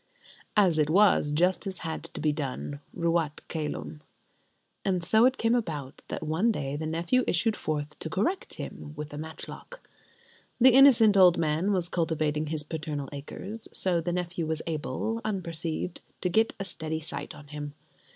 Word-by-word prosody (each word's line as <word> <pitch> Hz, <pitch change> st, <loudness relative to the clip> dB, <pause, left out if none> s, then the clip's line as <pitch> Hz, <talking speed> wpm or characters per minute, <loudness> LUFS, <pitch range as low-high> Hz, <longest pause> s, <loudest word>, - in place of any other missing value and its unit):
As 180 Hz, -6 st, +4 dB
it 150 Hz, -1 st, +2 dB
was, 185 Hz, -4 st, +5 dB
justice 180 Hz, +4 st, +1 dB
had 160 Hz, -1 st, -4 dB
to -, -, -6 dB
be 155 Hz, -, +3 dB
done, 145 Hz, -1 st, -4 dB, 0.2 s
ruat 165 Hz, -3 st, +1 dB
cælum: 80 Hz, -, -4 dB, 0.8 s
and 185 Hz, -3 st, 0 dB
so 220 Hz, +7 st, +5 dB
it 260 Hz, +1 st, +3 dB
came 230 Hz, 0 st, +2 dB
about 150 Hz, -, -2 dB
that -, -, -4 dB
one 165 Hz, +9 st, +2 dB
day 140 Hz, -8 st, -3 dB
the 155 Hz, +1 st, -3 dB
nephew 170 Hz, +10 st, +1 dB
issued 215 Hz, +5 st, +2 dB
forth 150 Hz, -1 st, -3 dB
to 160 Hz, -, -4 dB
correct 220 Hz, -, -1 dB
him 145 Hz, -, -7 dB
with 150 Hz, 0 st, -6 dB
a -, -, -5 dB
matchlock. 160 Hz, -, -7 dB, 0.7 s
The 255 Hz, +1 st, +8 dB
innocent 245 Hz, -6 st, +7 dB
old 180 Hz, -3 st, +7 dB
man 160 Hz, +5 st, +1 dB
was 180 Hz, -3 st, +1 dB
cultivating 155 Hz, -3 st, 0 dB
his 155 Hz, 0 st, -2 dB
paternal 150 Hz, -3 st, -4 dB
acres; 195 Hz, +10 st, -7 dB
so 175 Hz, -3 st, +2 dB
the 175 Hz, +2 st, -2 dB
nephew 175 Hz, -2 st, -2 dB
was 160 Hz, 0 st, -2 dB
able, 165 Hz, -, -2 dB
unperceived, 170 Hz, -5 st, -2 dB, 0.2 s
to 180 Hz, -, +1 dB
get 220 Hz, +5 st, +2 dB
a 195 Hz, -, -3 dB
steady 160 Hz, -3 st, -3 dB
sight 155 Hz, -, -6 dB
on 145 Hz, -1 st, -13 dB
him. 145 Hz, -1 st, -6 dB
165 Hz, 165 wpm, -28 LUFS, 150-195 Hz, 0.8 s, The